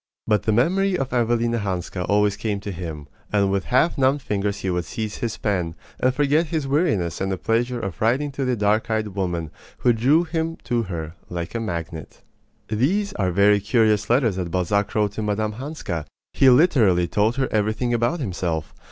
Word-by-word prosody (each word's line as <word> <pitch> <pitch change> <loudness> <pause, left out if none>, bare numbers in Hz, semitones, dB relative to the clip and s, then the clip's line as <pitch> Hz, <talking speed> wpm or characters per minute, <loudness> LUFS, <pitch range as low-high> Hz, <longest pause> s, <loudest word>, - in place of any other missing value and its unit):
But 105 -1 +2
the 110 - 0
memory 180 - +2
of 135 -4 -3
Evelina 120 -1 +1
Hanska 90 -2 -3
always 105 0 +3
came 105 -1 -2
to 100 - -5
him; 80 -5 -6 0.2
and 100 -2 +2
with 100 0 0
half 130 +5 +2
numbed 135 +1 +2
fingers 100 0 -2
he 95 - -1
would 90 -1 -1
seize 110 -3 -4
his 115 -2 -3
pen, 90 -6 -1 0.2
and 130 - +3
forget 145 +4 +2
his 155 -3 -2
weariness 135 - 0
in 95 - 0
the 95 - -1
pleasure 120 +5 0
of 95 -5 -5
writing 130 +6 +1
to 135 0 -3
the 125 -1 +1
dark 105 +2 +1
eyed 110 -1 0
woman 90 -5 -3 0.3
who 120 - +6
drew 135 +9 +3
him 165 -1 -2
to 120 -1 0
her 85 -6 -5 0.2
like 85 -1 -5
a 115 - -2
magnet. 85 -7 -6 0.4
These 180 - 0
are 95 -3 0
very 100 +3 +4
curious 105 -1 +2
letters 115 -5 +2
that 90 -2 -3
Balzac 95 +4 0
wrote 105 -2 +2
to 105 - -5
Mme. 105 0 -1
Hanska. 115 - -5 0.3
He 135 - +5
literally 120 - +4
told 105 +6 +1
her 135 -1 0
everything 110 +3 0
about 120 +9 +1
himself. 85 - -3
110 Hz, 190 wpm, -23 LUFS, 95-125 Hz, 0.4 s, who